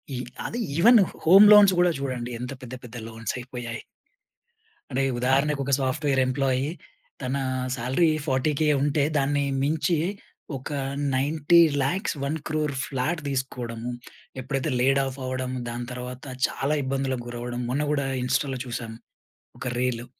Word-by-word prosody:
ఈ - - -3 0.3
అదే 235 - -3 0.2
even 230 +6 +7 0.3
home 195 +5 +9
loans 205 -2 +8
గూడా 175 0 +4
జూడండి. 125 -3 -3
ఎంత 125 +1 -5
పెద్ద 125 0 -9
పెద్ద 125 0 -11
లోన్స్ 115 -1 -4
అయిపోయాయి. 120 -1 -6 1.1
అంటే 130 +1 0 0.2
ఉదాహరణకు 140 +3 +2
ఒక 140 - -2
సాఫ్ట్‌వేర్ 135 +1 0
ఎంప్లాయి 130 0 0 0.5
తనా 135 +1 -1 0.3
శాలరీ 130 +7 +1 0.2
40 130 +2 +1
కే 155 - +2
ఉంటే 145 +1 +2
దాన్ని 145 0 +1 0.2
మించీ, 155 +2 +1 0.6
ఒక 130 - -8 0.5
90,00,000 150 - +3
1,00,00,000 150 0 -2
ఫ్లాట్ 150 +5 -2
తీసుకోడము. 125 -3 -3 0.5
ఎప్పుడైతే 135 +1 -2
లేడ్ 135 +2 +4
ఆఫ్ 135 0 -6
అవ్వడం, 130 0 -3 0.2
దాని 120 0 -5
తర్వాత 125 0 -7 0.2
చాలా 140 +3 -1
ఇబ్బందులకు 130 -2 -2
గురవడం. 120 0 -5
మొన్న 145 +3 0
గూడా 140 -2 0 0.2
ఇన్‌స్టాలో 130 +1 0
చూశాం, 120 -2 -5 0.7
ఒక 125 - -4
రీలు. 125 -1 -1
135 Hz, 130 wpm, -25 LUFS, 125-150 Hz, 1.1 s, home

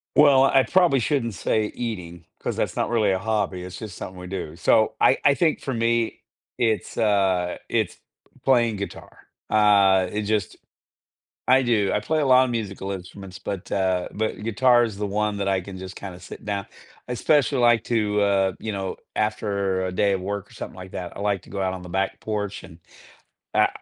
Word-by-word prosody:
Well, 140 -3 +7
I 135 0 +5
probably 175 -7 +3
shouldn't 115 -4 -1
say 105 +5 0
eating, 90 -8 -6
'cause - - -3
that's - - -1
not - - 0
really 110 -4 +2
a 95 - 0
hobby, 105 -4 -1
it's 90 -1 -8
just 105 -5 -7
something 95 0 -8
we 90 - -8
do, 90 -4 -5
so, 110 +5 +3
I 135 - +5
I 140 - +6
think 160 -1 +1
for 135 - -3
me, 115 0 0 0.4
it's, 110 -3 0
uh 95 -4 +2
it's - - 0 0.5
playing 120 -4 +3
guitar. 100 0 -8 0.3
Uh, 100 -3 +5
it 105 +1 -2
just 105 -2 -1 0.9
I 130 +1 +5
do, 110 -5 +2
I - - +2
play 155 +9 0
a 150 - +1
lot 130 0 +7
of 125 - -3
musical 100 -4 -4
instruments, 95 0 -8
but, 95 -3 -6
uh 95 -2 0
but 110 0 -3
guitar 120 +2 +4
is 110 -4 -3
the 105 0 -2
one 105 +1 -1
that 100 -1 -2
I 95 -1 +1
can 95 +1 -9
just 95 0 -8
kinda 95 -3 -8
sit 90 - -11
down 100 -2 -3 0.4
I 125 - -3
especially, 140 +1 +2
like 120 -2 +4
to, 105 -3 +1
uh, 100 -1 +3
you 110 - -4
know, 95 -1 -4 0.2
after 100 -3 -1
a 95 - -3
day 100 +2 +2
of 95 -1 -1
work 100 +1 -4
or - - -16
something - - -8
like 95 0 -10
that, 90 -1 -6
I - - -7
like 100 -2 0
to - - -16
go 100 0 -4
out 95 -1 0
on 90 - -7
the 90 - -10
back 95 +2 -1
porch, 105 -2 -4
and 80 - -15 0.8
I - - +5
105 Hz, 205 wpm, -24 LUFS, 95-115 Hz, 0.9 s, Well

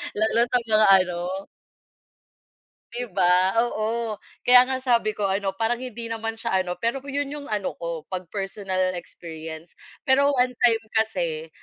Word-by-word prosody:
Lalo 220 +2 +2
sa 245 - +2
mga 215 -2 +4 0.2
ano 180 +2 -5 1.5
Di 245 +1 -4
ba? 185 +1 +3
Oo. 220 -1 -2 0.2
Kaya 250 +1 +7
nga 265 - 0
sabi 235 -4 +1
ko 205 - -2
ano, 195 0 -1
parang 230 +2 0
hindi 235 -2 -6
naman 225 0 -4
siya 225 -4 0
ano, 180 -1 -3
pero 235 +4 -1
yun 285 0 -2
yung 295 -1 -7
ano 210 -3 -2
ko 170 -2 -4
'pag 185 -2 -4
personal 195 -2 -2
experience. 165 -2 -9 0.3
Pero 280 +1 +4
one 250 0 +2
time 240 -2 +2
kasi 175 -8 -1
215 Hz, 150 wpm, -24 LUFS, 185-240 Hz, 1.5 s, Kaya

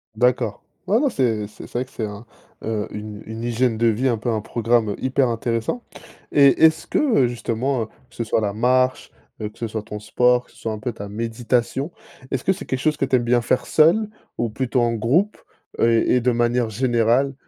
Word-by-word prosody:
D'accord. 120 -2 +1 0.2
Ouais, 215 +4 +3
non, 285 0 +2
c'est 115 - 0
c'est 105 - -12
vrai 125 +1 -2
que 130 - -23
c'est 110 - -3
un, 105 +2 -8 0.4
heu, 110 -2 -2
une 105 0 -7
une 110 +1 -7
hygiène 120 -1 +1
de 115 - +3
vie 115 +4 +2
un 120 -3 +1
peu, 120 - -2
un 110 -2 0
programme 115 -1 +1
hyper 130 0 +1
intéressant. 115 - -2 0.5
Et 140 +1 +5
est-ce 160 0 +3
que, - - 0
heu, 230 - +3
justement, 120 +1 -1
heu, - - -4 0.2
que - - -21
ce 115 - -2
soit 110 0 0
la 100 -2 -1
marche, 130 +3 +1 0.3
heu, 105 - -3
que - - -22
ce 115 - -3
soit 110 0 -4
ton 105 0 -7
sport, 125 +3 +2
que - - -24
ce - - -22
soit 115 - -4
un - - -5
peu 120 +3 -3
ta 100 -2 -8
méditation, 115 - -1 0.4
est-ce 135 - -2
que 190 - +3
c'est 195 - -9
quelque 130 - -2
chose 150 +2 +1
que 135 - +1
tu 130 0 +2
aimes 120 - +2
bien 120 0 +3
faire 120 - 0
seul, 170 +8 +4 0.3
ou 120 - 0
plutôt 130 +1 0
en 120 -1 +2
groupe, 145 - +1 0.4
heu, 115 - +4 0.2
et 125 - +3
de 125 +1 +2
manière 120 0 +1
générale, 120 +3 +2
120 Hz, 225 wpm, -22 LUFS, 110-130 Hz, 0.5 s, Et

